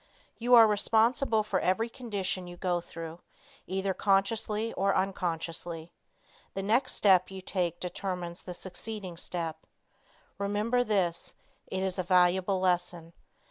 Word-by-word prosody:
You 245 +1 +5
are 230 -1 +10
responsible 220 +2 +2
for 210 - 0
every 205 +5 +1
condition 200 -7 -3
you 175 0 -9
go 175 -1 0
through, 165 0 -8 0.5
either 190 +1 -1
consciously 210 +3 +1
or 195 0 +1
unconsciously. 170 -3 -2 0.6
The 195 - -2
next 240 +6 +2
step 185 -3 +4
you 190 0 -7
take 180 -2 -2
determines 180 -1 -4
the 180 - -8
succeeding 190 0 -6
step. 165 -2 -4 0.7
Remember 210 +5 +1
this; 190 -7 -1 0.3
it 190 0 -2
is 190 0 -1
a - - +1
valuable 185 +1 +3
lesson. 175 -2 0
190 Hz, 130 wpm, -29 LUFS, 175-210 Hz, 0.7 s, are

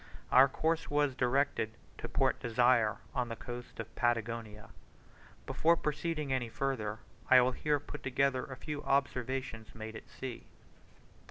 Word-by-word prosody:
Our 130 +2 +8
course 160 +4 0
was 145 -2 +2
directed 125 -3 +1 0.2
to - - -5
Port - - +1
Desire, 115 -2 +3 0.2
on 125 -1 -1
the 115 - -3
coast 120 +1 -8
of 115 0 -7
Patagonia. 115 -3 -1 0.8
Before 170 +1 +3
proceeding 150 -2 -2
any 125 -3 -1
further, 110 -5 -2 0.3
I 130 - +9
will 125 +1 +4
here 150 +3 0
put 145 - -8
together 135 -1 +1
a 130 - -8
few 150 0 -5
observations 130 -4 -1
made 110 0 -7
at - - -10
sea. 130 -3 -7
130 Hz, 145 wpm, -33 LUFS, 115-140 Hz, 0.8 s, I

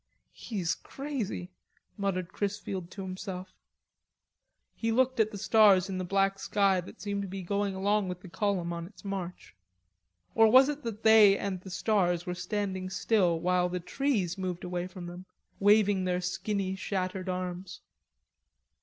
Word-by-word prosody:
"He's 190 -7 -2
crazy," 250 -10 -5 0.4
muttered 190 -4 -2
Chrisfield 200 -3 -3
to 195 +1 -7
himself. 185 0 -6 1.2
He 225 0 -2
looked 260 +1 +2
at 220 -1 +4
the 210 - -7
stars 200 -3 +5
in 185 -1 -3
the - - -2
black 195 +1 +1
sky 195 -3 +2
that 185 +6 -13
seemed 200 -1 -3
to 200 - -4
be 190 0 -6
going 200 +1 -1
along 200 0 +1
with 180 0 -6
the 185 - -11
column 190 -2 -1
on 170 0 -5
its 210 - -17
march. 190 -3 -5 0.8
Or 225 - +6
was 260 +3 +7
it 295 0 -3
that 225 -4 -6
they 215 -3 +7
and 190 -3 -3
the 190 - -10
stars 175 -3 +1
were 180 - -2
standing 190 0 -3
still 185 -3 +2
while 180 +1 +1
the 180 0 -3
trees 190 -2 -1
moved 180 -1 -3
away 180 0 -3
from 185 -1 -9
them, 175 +2 -9 0.3
waving 205 -2 +4
their 180 0 0
skinny 190 +1 -2
shattered 185 -1 -3
arms? 180 0 -4
190 Hz, 160 wpm, -29 LUFS, 180-205 Hz, 1.2 s, was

